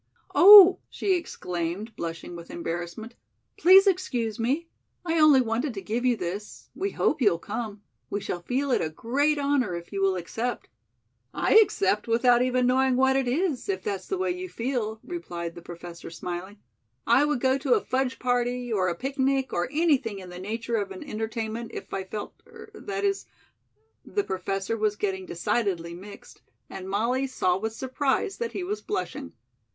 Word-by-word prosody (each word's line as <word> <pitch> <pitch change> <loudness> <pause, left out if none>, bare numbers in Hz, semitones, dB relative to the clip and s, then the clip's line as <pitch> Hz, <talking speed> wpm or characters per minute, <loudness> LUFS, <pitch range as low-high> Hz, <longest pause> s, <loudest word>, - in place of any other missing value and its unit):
"Oh," 390 -1 +10
she 390 - 0
exclaimed, 190 - -4
blushing 170 +1 -6
with 170 0 -10
embarrassment. 175 +7 -5 0.4
"Please 380 +3 +7
excuse 255 - 0
me. 275 +9 0 0.4
I 330 -1 +1
only 300 -4 +7
wanted 240 +2 -2
to 195 - -5
give 230 +5 -2
you 245 -2 +3
this. 195 +4 -6
We 395 - -2
hope 305 - 0
you'll 200 -8 +4
come. 205 +2 -6 0.3
We 205 - -2
shall 180 -3 -4
feel 265 +8 -1
it - - +2
a 160 - -1
great 280 - 0
honor 280 -9 +1
if 170 +3 -8
you 195 - -2
will 195 -1 +2
accept." 225 +8 -4 0.7
"I - - +1
accept 210 - +3
without 240 +1 +4
even 255 0 +2
knowing 260 +1 +3
what 265 +1 +3
it 270 -2 +1
is, 305 +4 -1
if 390 - -2
that's 410 -2 -4
the 385 - -2
way 375 -1 0
you 365 +1 -5
feel," 230 -5 -3
replied 175 - -6
the 170 - -10
Professor, 170 0 -9
smiling. 180 +4 -6 0.5
"I 275 - +5
would 295 -3 0
go 260 +2 +2
to 465 - +3
a 425 - -1
fudge 260 0 -1
party 245 -1 -1
or 185 -3 +1
a 175 - -1
picnic 270 - -1
or 175 +7 -1
anything 290 -9 +1
in 185 -2 -9
the 180 0 -9
nature 230 +4 -3
of 200 -2 -2
an 190 -1 -8
entertainment, 225 +1 -4
if - - -8
I 190 -1 -3
felt 210 +2 -6
er 450 -2 -13
that 400 -1 -5
is 395 -1 0 0.4
" 445 0 -44
the 410 - +2
Professor 195 - -2
was 215 -1 0
getting 190 -3 -3
decidedly 175 -2 -1
mixed, 200 +4 -12 0.3
and 190 0 -7
Molly 240 +7 0
saw 185 -8 0
with 220 +2 -3
surprise 265 - -1
that 470 -1 -3
he 370 - -3
was 415 +4 -3
blushing. 410 - -4
235 Hz, 180 wpm, -26 LUFS, 195-285 Hz, 0.7 s, Oh